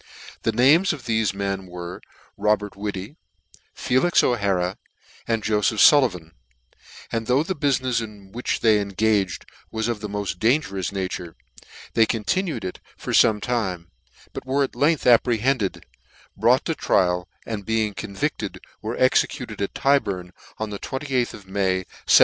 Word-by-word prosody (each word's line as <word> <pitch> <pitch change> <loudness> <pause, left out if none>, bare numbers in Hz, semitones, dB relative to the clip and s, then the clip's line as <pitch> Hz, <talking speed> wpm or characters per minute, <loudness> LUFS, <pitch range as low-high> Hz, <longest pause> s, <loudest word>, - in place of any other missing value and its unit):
The 115 - +1
names 145 - +4
of 150 - -8
thefe 110 -3 +1
men 100 -1 -3
were, 90 0 -7 0.3
Robert 105 -1 0
Whittv, 100 - -5 0.6
Felix 130 +8 +2
O'Hara, 95 -6 0 0.5
and 115 -2 0
Joleph 105 0 +1
Sullivan; 110 - +5 0.8
and 115 -1 -2
though 130 +4 +3
the 190 - -2
bufinefs 130 -4 +1
in 105 -3 -10
which 120 +4 -2
they 110 -2 +5
engaged 100 -1 0 0.2
was 110 0 -2
of 120 -3 -2
the 105 - -5
moft 100 -3 -3
dangerous 110 - +1
nature, 90 -3 -4 0.2
yet - - -19 0.3
they 115 -1 +4
continued 135 - -1
it 90 - -5 0.2
for - - -5
fome 105 -1 +5
time: 95 -8 -2 0.4
but - - -6
were 135 +2 +1
at 135 - -4
length 145 +4 +2
apprehended, 120 -2 +2 0.5
brought - - +3
to - - 0
trial, 90 -1 +1 0.2
and 110 -3 -4
being 110 0 0
convicted, 100 0 -4 0.2
were 110 +3 -4
exe 130 - +4
cuted 120 -8 -8
at 100 - -3
Tyburn 100 -11 +1 0.3
on 110 -1 -4
the 100 - -5
23th 130 -3 -2
of 100 - -13
May, 95 -1 0 0.2
1715. - - +9
110 Hz, 150 wpm, -23 LUFS, 95-125 Hz, 0.8 s, 1715